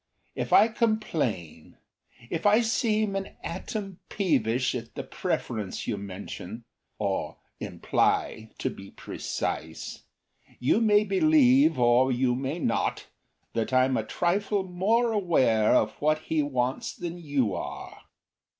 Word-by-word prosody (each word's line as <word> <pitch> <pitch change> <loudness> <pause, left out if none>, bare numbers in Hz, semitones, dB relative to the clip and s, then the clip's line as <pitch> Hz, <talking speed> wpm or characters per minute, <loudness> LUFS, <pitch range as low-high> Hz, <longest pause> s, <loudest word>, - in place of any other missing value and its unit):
If - - -4
I 220 - +7
complain, 150 - -2 0.5
If 165 +4 0
I 210 +3 +5
seem 215 -3 +1
an 195 0 -4
atom 195 +2 -5
peevish 125 - +1
at 115 -2 -6
the - - -4
preference 105 -5 -3
you 115 - -1
mention 100 +2 -7 0.3
Or 100 -2 -2 0.2
imply, 110 0 0
to - - -2
be 95 0 -11
precise 80 +1 -5 0.6
you 140 - +2
may 210 -2 +5
believe, 270 +7 +4
or 120 +2 +4
you 125 0 +2
may 135 +5 -2
not, 120 -9 -1 0.4
That 115 +2 -2
I'm 130 0 +4
a 110 - 0
trifle 195 - 0
more 205 +6 +1
aware 135 - +3
of 110 - +3
what 155 +1 +3
he 160 -1 0
wants 130 -3 -2
than 175 0 -6
you 140 -8 0
are. - - -7
150 Hz, 125 wpm, -27 LUFS, -, 0.6 s, I